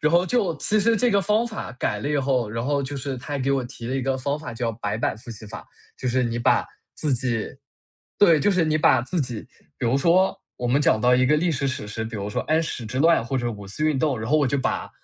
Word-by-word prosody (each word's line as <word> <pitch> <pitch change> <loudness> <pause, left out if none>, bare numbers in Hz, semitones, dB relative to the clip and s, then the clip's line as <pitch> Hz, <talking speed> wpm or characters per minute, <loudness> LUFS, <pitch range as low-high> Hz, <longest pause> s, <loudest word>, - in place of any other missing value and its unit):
然 150 - +2
后 175 +2 +4
就 185 -5 0
其 210 +9 +1
实 230 +2 +3
这 245 +2 +2
个 200 -2 +3
方 210 +4 +1
法 215 - -6
改 115 -4 -2
了 125 - -3
以 150 - +1
后， 130 -4 +1
然 115 +2 -3
后 140 0 0
就 140 +1 -5
是 135 0 -4
他 130 +4 -6
还 - - -1
给 135 +1 0
我 135 -2 +1
提 120 -1 -9
了 130 - -2
一 135 - 0
个 135 +1 0
方 140 +3 -2
法， 155 - -7
叫 115 0 -1
白 105 -1 -3
板 115 - -1
复 115 +2 -11
习 110 -1 -9
法。 105 -2 -9 0.3
就 130 - -2
是 125 +1 +1
你 120 -1 -1
把 120 - +3 0.3
自 150 - 0
己 120 -3 -1 0.7
对， 170 -6 +6
就 205 - +3
是 180 -4 +2
你 155 0 +1
把 130 -4 +4
自 165 +7 -2
己 125 -5 -3 0.4
比 125 - -1
如 125 +4 +2
说 175 +6 +3 0.2
我 125 - -3
们 130 +4 +2
讲 110 - +3
到 125 +2 +4
一 130 0 +3
个 150 +3 +4
历 170 +3 +1
史 140 -3 -1
史 130 -5 -4
实， 110 +1 -4
比 110 0 -6
如 100 0 -4
说 - - -1
安 160 +1 +1
史 125 -7 -5
之 130 +5 -4
乱 165 -3 +4
或 135 +3 -2
者 120 -2 -1
五 105 -3 -8
四 130 +11 -3
运 155 -3 +2
动， 140 -4 +1
然 110 +1 -4
后 155 - +4
我 145 - +2
就 135 +2 0
把 130 - -2
135 Hz, 305 characters per minute, -24 LUFS, 120-155 Hz, 0.7 s, 对